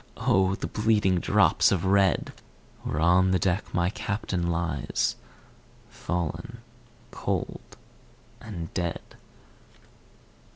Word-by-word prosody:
O 95 0 +2
the - - -5
bleeding 105 -4 +2
drops - - +3
of 95 -2 0
red, 95 -1 +2 0.5
Where 75 - -3
on 90 +3 +4
the 95 - +3
deck 90 +3 -1
my 90 +1 +1
Captain 100 -4 -2
lies, 85 -5 -1 0.8
Fallen 90 +8 -4 0.5
cold - - -4 0.6
and 85 -7 -7
dead. 85 -2 -2
95 Hz, 95 wpm, -26 LUFS, 85-100 Hz, 0.8 s, on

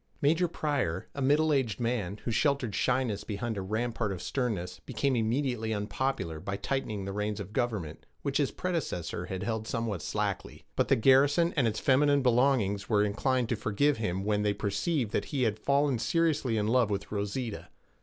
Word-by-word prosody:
Major 165 +4 +3
Pryor, 140 - -2
a 140 - -5
middle 150 +3 +3
aged 130 -6 0
man, 115 -5 -1
who 120 - 0
sheltered 125 -1 +1
shyness 125 -2 0
behind 110 +2 -3
a 100 - -3
rampart 110 +2 -1
of 95 - -4
sternness, 110 -7 -2
became 140 -2 0
immediately 115 -1 0
unpopular 105 -5 -2
by 100 +4 -4
tightening 105 -3 -2
the 100 - -3
reins 105 +1 -2
of 100 +1 -7
government, 105 -12 -2 0.2
which 140 -1 0
his 140 - +2
predecessor 165 - -3
had 95 0 -4
held 110 0 -2
somewhat 115 -7 -2
slackly. - - -3
But - - +2
the - - +4
garrison 140 +8 +4
and 135 -6 +3
its 110 -1 -1
feminine 140 +1 +3
belongings 120 -6 +2
were 105 -2 +4
inclined 120 +4 +1
to 120 - +1
forgive 110 +7 +1
him 95 -3 -2
when 105 0 +1
they 105 0 +2
perceived 105 - -1
that - - 0
he 140 -4 -1
had 110 -2 0
fallen 140 0 +2
seriously 150 -3 +1
in 105 - +1
love 120 -1 +3
with 100 0 -3
Rosita. 105 +2 -3
115 Hz, 180 wpm, -29 LUFS, 105-135 Hz, 0.2 s, the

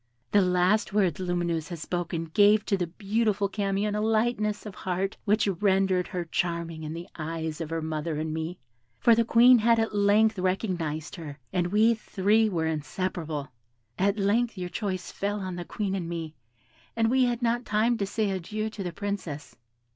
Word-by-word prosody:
"The 205 - +5
last 185 +3 +2
words 190 -7 +2
Lumineuse 175 -3 -1
had 170 - -6
spoken 170 0 -3
gave 205 0 +5
to 200 - +1
the 180 -3 -1
beautiful 205 +3 0
Camion 200 +1 -1
a 210 - -1
lightness 215 -1 0
of 210 - -7
heart 190 +2 -2
which 210 +1 +3
rendered 190 -1 +2
her 175 -2 -4
charming 170 -1 -2
in 155 0 -5
the 170 +1 -7
eyes 160 0 -4
of 160 - -4
her 165 -1 -2
mother 155 0 -2
and 155 0 -2
me; 160 +3 -4 0.4
for 235 - +6
the 230 +1 +4
Queen 240 +2 +6
had 230 +1 +4
at 225 -1 0
length 205 +1 +3
recognised 180 -5 -2
her, 150 -4 -8 0.2
and 175 -2 +1
we 215 +5 +4
three 215 0 +2
were 165 -5 -1
inseparable. 160 -1 -3 0.5
At 200 +2 +2
length 215 +3 +1
your 180 -1 -4
choice 185 -3 -3
fell 205 +1 -2
on 185 -2 -4
the 175 0 -5
Queen 200 0 -3
and 180 -4 -3
me, 165 -2 -5 0.6
and 225 0 +2
we 260 0 +4
had 240 0 -1
not 240 +1 +1
time 225 +2 +2
to 200 - -1
say 210 0 0
adieu 215 +4 -3
to 210 - -7
the 180 -2 -3
Princess. 180 -6 -5
195 Hz, 185 wpm, -27 LUFS, 170-215 Hz, 0.6 s, for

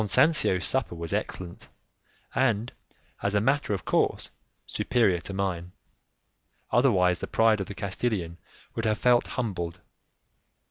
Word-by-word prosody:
Don 110 - -1
Sancio's 130 - +4
supper 130 -9 +1
was 85 -1 -4
excellent, 90 -1 -4 0.7
and, 120 -2 +1 0.5
as 100 +1 -1
a - - +4
matter 135 +3 +1
of 100 - -2
course, - - 0 0.3
superior 110 -8 +1
to 95 - -7
mine; 95 -2 -3 1.0
otherwise 95 -8 +3
the - - -4
pride 110 -1 +3
of 95 - -4
the 100 - -8
Castilian 95 -4 -3 0.3
would 115 - -3
have 110 -1 +1
felt 125 +1 +3
humbled. 90 -9 -3
100 Hz, 135 wpm, -27 LUFS, 90-120 Hz, 1.0 s, Sancio's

